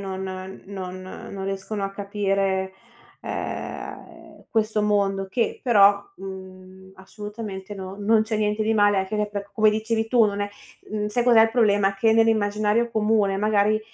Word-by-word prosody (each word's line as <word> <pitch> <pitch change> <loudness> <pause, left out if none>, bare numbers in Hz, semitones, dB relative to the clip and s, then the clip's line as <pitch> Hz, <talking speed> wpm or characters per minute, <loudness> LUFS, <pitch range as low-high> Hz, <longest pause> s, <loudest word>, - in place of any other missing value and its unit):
non 190 -1 -5 0.4
non 185 -1 -7 0.3
non 195 -1 -6
riescono 195 +1 -3
a 195 - -3
capire, 195 -1 -1 0.5
ehm, - - -7
questo 215 -1 +1
mondo 200 -2 +1
che 235 +3 -1
però, 200 -4 +5
mhmm, 190 0 -10
assolutamente 205 0 -8
n 190 0 -7
non 215 +2 +4
c'è 220 0 -2
niente 210 0 0
di 225 +1 +1
male 205 -1 +4
anche 190 +2 -2
che 210 0 0
per 200 -1 -6
come 215 -1 +4
dicevi 220 +1 -1
tu 235 -1 +5
non 205 -1 -1
è 205 - -1 0.4
mhmm, 210 0 -2
sai 225 +3 0
cos'è 235 -2 +6
il 225 - +3
problema? 205 -4 +3
Che 220 +3 +3
nell'immaginario 220 0 +2
comune 210 -3 +2
magari, 210 +1 +2
205 Hz, 155 wpm, -24 LUFS, 195-220 Hz, 0.5 s, cos'è